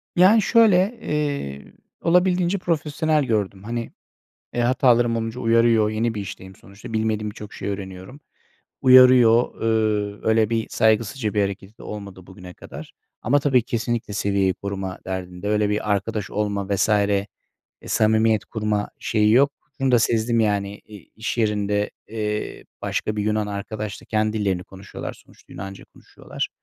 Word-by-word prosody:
Yani, 195 Hz, +5 st, +6 dB
şöyle, 215 Hz, -1 st, +4 dB
eee, 140 Hz, -, -3 dB, 0.3 s
olabildiğince 180 Hz, +2 st, +2 dB
profesyonel 155 Hz, -3 st, 0 dB
gördüm. 100 Hz, -5 st, -2 dB
Hani, 115 Hz, +1 st, -4 dB, 0.6 s
eee, 120 Hz, -, 0 dB
hatalarım 120 Hz, -2 st, +3 dB
olunca 115 Hz, +2 st, -3 dB
uyarıyor, 115 Hz, -2 st, +3 dB
yeni 110 Hz, +1 st, -1 dB
bir 105 Hz, -, -4 dB
işteyim 95 Hz, -1 st, -9 dB
sonuçta, 100 Hz, +3 st, -12 dB
bilmediğim 110 Hz, -1 st, -1 dB
birçok 105 Hz, 0 st, -10 dB
şeyi 100 Hz, -, -4 dB
öğreniyorum. 95 Hz, +6 st, -8 dB, 0.6 s
Uyarıyor. 125 Hz, -2 st, +6 dB
Eee, 110 Hz, -2 st, 0 dB
öyle 110 Hz, -1 st, +3 dB
bir 115 Hz, -1 st, -1 dB
saygısızca 110 Hz, +1 st, +1 dB
bir 105 Hz, -, +2 dB
hareketi 100 Hz, +2 st, -4 dB
de -, -, -13 dB
olmadı 100 Hz, -3 st, -8 dB
bugüne 90 Hz, -1 st, -11 dB
kadar. -, -, -11 dB, 0.3 s
Ama 140 Hz, +6 st, +2 dB
tabii 135 Hz, -3 st, +3 dB
kesinlikle 120 Hz, -3 st, -3 dB
seviyeyi 100 Hz, -2 st, +1 dB
koruma 95 Hz, -1 st, -5 dB
derdinde. 90 Hz, +1 st, -5 dB
Öyle 105 Hz, -1 st, +1 dB
bir 105 Hz, 0 st, -1 dB
arkadaş 105 Hz, +1 st, -2 dB
olma 100 Hz, -2 st, -2 dB
vs. 105 Hz, -, +1 dB
eee, 100 Hz, -1 st, +2 dB, 0.6 s
samimiyet 110 Hz, 0 st, +2 dB
kurma 105 Hz, -2 st, -2 dB
şeyi 105 Hz, -1 st, +2 dB
yok, 140 Hz, +4 st, +5 dB, 0.3 s
bunu 135 Hz, -1 st, +2 dB
da 120 Hz, -, +6 dB
sezdim 115 Hz, 0 st, +1 dB
yani. 100 Hz, -1 st, 0 dB
İ 105 Hz, -3 st, -15 dB
iş 110 Hz, +1 st, -4 dB
yerinde, 105 Hz, -1 st, 0 dB, 0.2 s
eee, 105 Hz, -1 st, -4 dB, 0.2 s
başka 110 Hz, -, -2 dB
bir 105 Hz, -, 0 dB
Yunan 105 Hz, 0 st, 0 dB
arkadaşla 105 Hz, +1 st, -6 dB
kendi 110 Hz, -1 st, 0 dB
dillerini 95 Hz, -3 st, -1 dB
konuşuyorlar, 95 Hz, +1 st, -8 dB
sonuçta -, -, -19 dB
Yunanca 95 Hz, +1 st, -8 dB
konuşuyorlar. -, -, -6 dB
110 Hz, 145 wpm, -22 LUFS, 100-120 Hz, 0.6 s, Yani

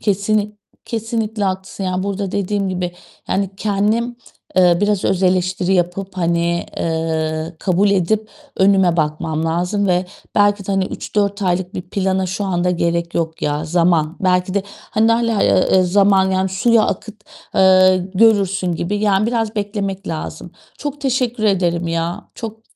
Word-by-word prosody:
Kesinlik 210 Hz, +1 st, 0 dB, 0.3 s
kesinlikle 225 Hz, -2 st, -2 dB
haklısın, 190 Hz, +1 st, -3 dB
yani, 185 Hz, 0 st, -1 dB
burada 200 Hz, -1 st, -3 dB
dediğim 200 Hz, 0 st, -1 dB
gibi, 180 Hz, -1 st, -3 dB, 0.4 s
yani 195 Hz, -1 st, 0 dB
kendim, 215 Hz, +4 st, 0 dB, 0.4 s
eee, 175 Hz, -2 st, +5 dB
biraz 205 Hz, -2 st, +1 dB
öz 190 Hz, 0 st, +1 dB
eleştiri 185 Hz, 0 st, +1 dB
yapıp, 185 Hz, +2 st, -1 dB
hani, 170 Hz, -1 st, 0 dB
eee, 160 Hz, 0 st, -2 dB
kabul 195 Hz, +3 st, +2 dB
edip 210 Hz, +3 st, +1 dB, 0.3 s
önüme 190 Hz, -3 st, +4 dB
bakmam 155 Hz, 0 st, -1 dB
lazım 180 Hz, +5 st, 0 dB
ve 180 Hz, 0 st, +2 dB, 0.3 s
belki 205 Hz, -1 st, +2 dB
de 200 Hz, -, -1 dB
hani 195 Hz, -1 st, +1 dB
3-4 200 Hz, +1 st, -2 dB
aylık 180 Hz, 0 st, -1 dB
bir 180 Hz, -, -4 dB
plana 190 Hz, 0 st, -1 dB
şu 190 Hz, +3 st, -3 dB
anda 180 Hz, -2 st, 0 dB
gerek 170 Hz, -1 st, -1 dB
yok 160 Hz, -1 st, -2 dB
ya. 150 Hz, +1 st, -1 dB
Zaman. 165 Hz, -1 st, +1 dB
Belki 185 Hz, -1 st, +1 dB
de, 200 Hz, -, +1 dB, 0.3 s
hani 225 Hz, +1 st, +3 dB
hâlâ, 230 Hz, -2 st, +1 dB
eee, 185 Hz, 0 st, +4 dB
zaman, 190 Hz, +1 st, +3 dB
yani, 190 Hz, 0 st, +1 dB
suya 220 Hz, +4 st, +3 dB
akıt, 215 Hz, -, -4 dB, 0.4 s
eee, 185 Hz, 0 st, +6 dB, 0.2 s
görürsün 195 Hz, -3 st, +3 dB
gibi, 170 Hz, +5 st, -2 dB
yani, 205 Hz, 0 st, +2 dB
biraz 225 Hz, -2 st, -1 dB
beklemek 200 Hz, -1 st, -3 dB
lazım. 160 Hz, -2 st, -5 dB, 0.3 s
Çok 290 Hz, 0 st, -5 dB
teşekkür 250 Hz, -4 st, -1 dB
ederim 175 Hz, -4 st, +1 dB
ya. 170 Hz, +4 st, -3 dB
Çok 220 Hz, -1 st, -7 dB
190 Hz, 150 wpm, -18 LUFS, 175-205 Hz, 0.4 s, eee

